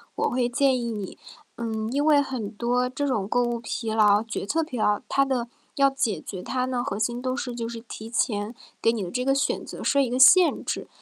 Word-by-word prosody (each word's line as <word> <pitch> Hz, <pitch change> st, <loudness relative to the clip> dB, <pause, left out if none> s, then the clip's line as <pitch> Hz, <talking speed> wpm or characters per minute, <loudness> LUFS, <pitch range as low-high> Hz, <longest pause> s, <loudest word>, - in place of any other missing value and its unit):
我 -, -, 0 dB
会 245 Hz, -1 st, 0 dB
建 260 Hz, 0 st, +2 dB
议 235 Hz, -1 st, -3 dB
你 205 Hz, -4 st, -6 dB, 0.4 s
嗯， 220 Hz, -1 st, -3 dB
因 285 Hz, +3 st, 0 dB
为 300 Hz, -2 st, +5 dB
很 255 Hz, -7 st, -3 dB
多 245 Hz, +3 st, 0 dB
这 285 Hz, +3 st, -3 dB
种 220 Hz, -8 st, -1 dB
购 245 Hz, +3 st, +2 dB
物 240 Hz, -1 st, -1 dB
疲 230 Hz, -1 st, -4 dB
劳、 210 Hz, -1 st, +4 dB
决 225 Hz, -3 st, -5 dB
策 325 Hz, +8 st, +1 dB
疲 255 Hz, -6 st, -6 dB
劳， 210 Hz, -1 st, +2 dB
它 275 Hz, -, +2 dB
的 260 Hz, -3 st, -1 dB, 0.3 s
要 275 Hz, -2 st, +4 dB
解 230 Hz, -, -1 dB
决 185 Hz, +3 st, -7 dB
它 255 Hz, +4 st, -2 dB
呢， 250 Hz, -1 st, -2 dB
核 245 Hz, -7 st, -3 dB
心 240 Hz, +3 st, -1 dB
都 255 Hz, +1 st, -2 dB
是 250 Hz, -3 st, -4 dB
就 230 Hz, -1 st, -4 dB
是 230 Hz, -1 st, -7 dB
提 225 Hz, -1 st, -9 dB
前 220 Hz, -1 st, -1 dB, 0.3 s
给 230 Hz, -, +4 dB
你 225 Hz, -3 st, -3 dB
的 175 Hz, -, -6 dB
这 250 Hz, -, -1 dB
个 270 Hz, +1 st, +2 dB
选 275 Hz, -, 0 dB
择 -, -, -8 dB
设 280 Hz, -, +3 dB
一 265 Hz, -, 0 dB
个 245 Hz, -, -1 dB
限 340 Hz, +7 st, +6 dB
制。 -, -, -3 dB
240 Hz, 255 characters per minute, -25 LUFS, 220-260 Hz, 0.4 s, 限